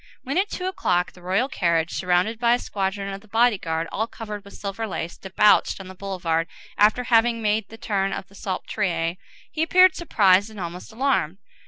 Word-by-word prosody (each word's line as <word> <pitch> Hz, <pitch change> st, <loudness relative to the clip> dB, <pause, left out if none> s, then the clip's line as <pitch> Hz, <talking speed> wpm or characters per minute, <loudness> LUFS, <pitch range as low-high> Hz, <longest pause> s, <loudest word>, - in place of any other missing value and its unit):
When, 275 Hz, +7 st, 0 dB
at 405 Hz, +2 st, 0 dB
two 365 Hz, -, -4 dB
o'clock, 180 Hz, -, 0 dB
the 180 Hz, -, -17 dB
royal 190 Hz, +8 st, +1 dB
carriage, 170 Hz, -, 0 dB
surrounded 185 Hz, +5 st, 0 dB
by 235 Hz, 0 st, +4 dB
a -, -, -4 dB
squadron 195 Hz, -1 st, -3 dB
of 195 Hz, -, -7 dB
the 215 Hz, -, -19 dB
body 225 Hz, -1 st, +3 dB
guard 165 Hz, -1 st, -2 dB
all 220 Hz, +2 st, -1 dB
covered 210 Hz, -3 st, -7 dB
with 200 Hz, -, -13 dB
silver 205 Hz, +3 st, -4 dB
lace, 170 Hz, -4 st, -4 dB
debouched 200 Hz, +3 st, +3 dB
on 190 Hz, -1 st, -9 dB
the -, -, -8 dB
boulevard, 180 Hz, -4 st, -2 dB, 0.3 s
after 215 Hz, +4 st, +4 dB
having 230 Hz, 0 st, +3 dB
made 215 Hz, -1 st, 0 dB
the 225 Hz, -, -11 dB
turn 195 Hz, -3 st, -1 dB
of 190 Hz, -, -5 dB
the 200 Hz, -, -21 dB
Salpêtrière, 180 Hz, -3 st, -2 dB, 0.3 s
he 310 Hz, -, -3 dB
appeared 365 Hz, +3 st, +5 dB
surprised 200 Hz, -, +3 dB
and 215 Hz, -2 st, -11 dB
almost 175 Hz, +3 st, -6 dB
alarmed. 220 Hz, -, 0 dB
200 Hz, 195 wpm, -24 LUFS, 180-225 Hz, 0.3 s, appeared